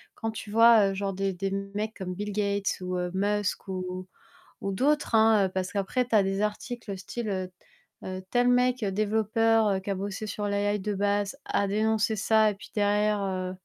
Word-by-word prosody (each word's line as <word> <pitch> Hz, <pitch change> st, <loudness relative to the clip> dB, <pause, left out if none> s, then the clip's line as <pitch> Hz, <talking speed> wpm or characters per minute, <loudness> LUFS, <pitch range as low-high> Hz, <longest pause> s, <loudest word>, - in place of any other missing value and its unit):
quand, 225 Hz, -, -3 dB
tu 220 Hz, -1 st, -8 dB
vois, 225 Hz, -2 st, +6 dB
heu, -, -, -3 dB
genre, 195 Hz, 0 st, -2 dB
des 195 Hz, 0 st, -1 dB
des 195 Hz, +2 st, -3 dB, 0.2 s
mecs 215 Hz, +2 st, -3 dB
comme 185 Hz, -2 st, -4 dB
Bill 205 Hz, +2 st, -4 dB
Gates 200 Hz, -1 st, 0 dB
ou, 180 Hz, 0 st, -3 dB
heu, 180 Hz, 0 st, -2 dB
Musk 205 Hz, +1 st, -1 dB
ou 185 Hz, 0 st, -4 dB, 0.5 s
ou 195 Hz, -, -2 dB
d'autres, 285 Hz, +3 st, +1 dB
hein, 220 Hz, -3 st, +5 dB
heu, -, -, -7 dB
parce 185 Hz, 0 st, -3 dB
qu'après 205 Hz, +5 st, 0 dB
tu 245 Hz, -, -8 dB
as 210 Hz, -, +6 dB
des 195 Hz, 0 st, -1 dB
articles, 210 Hz, +1 st, -4 dB
heu, -, -, -3 dB
style, 215 Hz, +4 st, -5 dB
heu, 185 Hz, -2 st, -3 dB, 0.5 s
heu, 185 Hz, 0 st, -5 dB
tel 245 Hz, 0 st, +3 dB
mec, 250 Hz, -1 st, +2 dB
développeur 215 Hz, 0 st, +2 dB
qui 195 Hz, -, -7 dB
a -, -, -1 dB
bossé 200 Hz, +2 st, -4 dB
sur 205 Hz, 0 st, -4 dB
l' 200 Hz, -, -1 dB
AI 205 Hz, +1 st, +1 dB
de 205 Hz, +2 st, -2 dB
base 205 Hz, +2 st, 0 dB
a 200 Hz, -, +1 dB
dénoncé 220 Hz, +2 st, +1 dB
ça 220 Hz, +1 st, +3 dB
et -, -, -8 dB
puis 200 Hz, -, -13 dB
derrière, 210 Hz, 0 st, +2 dB
heu, 185 Hz, -1 st, -2 dB
205 Hz, 205 wpm, -27 LUFS, 195-220 Hz, 0.5 s, vois